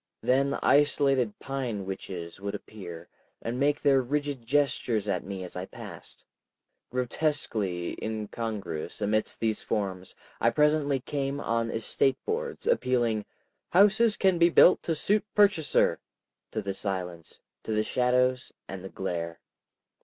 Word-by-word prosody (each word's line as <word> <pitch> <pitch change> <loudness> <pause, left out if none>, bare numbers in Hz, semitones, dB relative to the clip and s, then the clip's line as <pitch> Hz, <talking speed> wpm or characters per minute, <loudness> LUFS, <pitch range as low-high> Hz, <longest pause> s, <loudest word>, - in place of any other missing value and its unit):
Then 140 +2 +2
isolated 140 -5 +3
pine 125 -8 -3
witches 90 -3 -6
would 100 0 -3
appear, 85 -5 -9 0.3
and 120 +2 -4
make 145 +1 +2
their 135 -2 +4
rigid 140 -2 -2
gestures 125 -6 +1
at 95 -3 -1
me 95 -1 -5
as 90 - -8
I 90 +1 -4
passed. - - -11 0.6
Grotesquely 120 - -1
incongruous 105 -6 -4
amidst 110 +1 0
these 110 -1 0
forms, 95 -4 -3 0.2
I 115 - +4
presently 150 0 +2
came 140 +1 -2
on 115 -3 0
estate 125 +4 +1
boards, 470 +1 -3
appealing, 120 - +1 0.5
"Houses 210 +4 +5
can 190 -3 +3
be 170 0 +6
built 180 - +6
to 165 - -1
suit 205 +7 +1
purchaser," 200 -7 +3 0.5
to 110 - -3
the 100 0 -2
silence, 90 -4 -5 0.2
to - - -5
the 110 0 +2
shadows, 125 +1 +1 0.2
and 95 -1 -7
the 95 - -6
glare. 85 -3 -4
120 Hz, 130 wpm, -28 LUFS, 100-145 Hz, 0.6 s, be